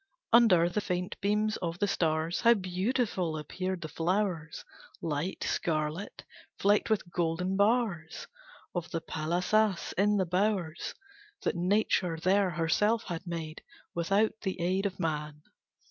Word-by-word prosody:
Under 215 -8 +6
the 175 +4 -1
faint 180 -2 -2
beams 210 +2 +1
of 170 -1 -3
the 205 - +1
stars 160 -1 0
How 235 0 +6
beautiful 185 -2 -1
appeared 185 +4 -4
the 155 - -4
flowers, 165 0 -1 0.3
Light 160 +4 -2
scarlet, 155 +3 -2 0.3
flecked 205 +2 +3
with 200 -5 0
golden 175 +2 0
bars 200 -6 +1 0.5
Of 175 -1 -3
the 165 - -2
palâsas, 180 +6 0
in 205 +1 +4
the 190 - +2
bowers 180 -2 -1 0.5
That - - 0
Nature 180 -2 +1
there 190 +3 +3
herself 180 +7 +1
had 175 0 -6
made 165 -2 -5 0.3
Without 195 +6 +2
the 190 -2 -3
aid 185 +3 +1
of 190 - -8
man. 150 -2 -3
180 Hz, 130 wpm, -30 LUFS, 165-205 Hz, 0.5 s, Under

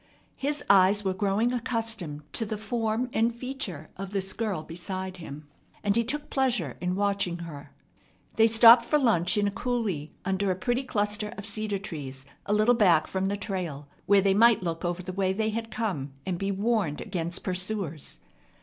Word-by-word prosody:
His 290 +1 -1
eyes 200 +1 +5
were 190 - +1
growing 205 +5 +1
accustomed 225 - -2
to - - +1
the 215 0 -3
form 225 +2 -1
and 225 +2 +2
feature 235 - -5
of 195 0 -5
this 195 -1 -3
girl 210 -8 -2
beside 185 +3 -5
him, 150 -3 -9 0.4
and 205 -1 +2
he 235 - +3
took 290 +6 -2
pleasure 240 - +1
in 180 0 -1
watching 200 -3 0
her. 145 -3 -10 0.6
They 225 0 +5
stopped 230 +1 +8
for 300 - +2
lunch 210 - +2
in 205 0 +2
a - - -1
coulee 205 - -2
under 190 +1 0
a 185 - +1
pretty 245 +7 0
cluster 210 -2 -1
of 200 - -5
cedar 215 -1 -2
trees 140 -8 -7 0.2
a 205 - +1
little 215 +3 +4
back 180 -9 +4
from 190 0 -2
the 200 +1 -1
trail, 175 -8 -4 0.2
where 200 0 +6
they 195 0 +3
might 225 -1 +5
look 165 -2 -3
over 175 +1 -2
the 185 - -6
way 190 0 +1
they 220 +2 0
had 225 +1 -4
come 180 - -3
and 180 -2 -2
be 195 - -1
warned 200 -6 0
against 175 -3 -4
pursuers. 185 -4 -2
200 Hz, 185 wpm, -27 LUFS, 180-225 Hz, 0.6 s, stopped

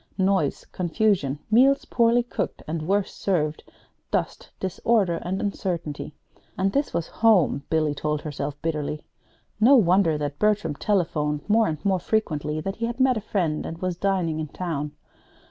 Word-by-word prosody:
Noise, 190 -6 +1
confusion, 180 -5 +1
meals 270 +5 +5
poorly 235 0 +3
cooked 240 - -4
and 155 0 -3
worse 200 +1 +1
served, 155 -6 -1 0.5
dust, - - -2
disorder, 190 -1 +1
and 190 +2 -3
uncertainty. 170 -7 -3 0.4
And 195 +1 +1
this 280 +1 0
was 170 - -1 0.2
home, 185 -11 +4
Billy 155 -2 +1
told 150 +1 -2
herself 145 -1 -4
bitterly. 150 -2 -2 0.6
No 245 +6 +7
wonder 180 - +4
that 145 -1 -4
Bertram 210 -7 +2
telephoned 150 -4 -1
more 220 +1 +4
and 155 - -2
more 190 -2 +2
frequently 155 -7 -1
that 195 +4 -4
he 230 +1 -1
had 240 +2 -5
met 260 -1 +4
a 220 - -2
friend, 175 -7 -1
and 165 - -6
was 185 0 -2
dining 180 -4 0
in 155 - -3
town. 150 -2 -4
180 Hz, 155 wpm, -25 LUFS, 150-210 Hz, 0.6 s, No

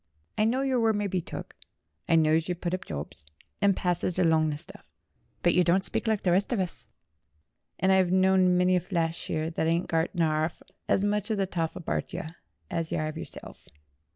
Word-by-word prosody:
I 215 - +2
know 250 +4 +1
your 265 -2 +1
word 225 -1 +3
mye 205 0 -1
be 185 -2 -1
took; - - -8 0.5
I - - +5
knows 160 0 +3
yer 180 - 0
puts 175 0 -4
up 185 - -3
jobs, 75 -1 -6 0.4
and 200 -2 +4
passes 180 0 -1
along 160 -3 +3
the 145 - -3
stuff. - - -14 0.6
But 175 - +4
yer 180 - +4
don't 180 +3 +2
speak - - -2
like 220 -2 +1
the 180 - +2
rest 190 +6 +2
of 240 - +1
us, 180 -3 -4 0.9
and 190 - +3
I've 190 -2 +4
knowed 190 0 +4
many 180 0 +4
flashier 165 -2 -2
thet 160 - 0
'adn't 170 +2 0
got 165 +1 +1
'arf 155 0 0 0.3
as 195 - +3
much 205 0 0
of 215 - 0
the 195 - +1
toff 165 -3 -2
abart 175 - -3
'em 170 -3 -5 0.4
as 165 -1 -2
yer 155 - 0
'ave 155 +1 -5
yer - - -5
self. - - -12
180 Hz, 205 wpm, -28 LUFS, 165-190 Hz, 0.9 s, I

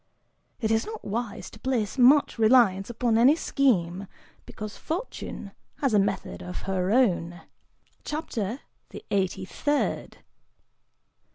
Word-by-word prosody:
It 220 -3 0
is 225 0 +2
not 440 0 -7
wise 220 +1 -4
to 220 - -14
place 245 -2 -1
much 265 0 +5
reliance 220 -4 +4
upon 235 -1 +1
any 265 +6 +6
scheme, 200 - 0 0.4
because 215 0 -7
Fortune 365 +10 -5 0.2
has 270 -5 0
a 210 - +5
method 195 -1 -2
of 180 - -7
her 185 -1 -1
own. 175 -8 +1 0.6
CHAPTER 260 - -4 0.3
THE - - -10
EIGHTY 190 -1 0
THIRD. 290 +10 -2
225 Hz, 120 wpm, -26 LUFS, 195-260 Hz, 0.6 s, any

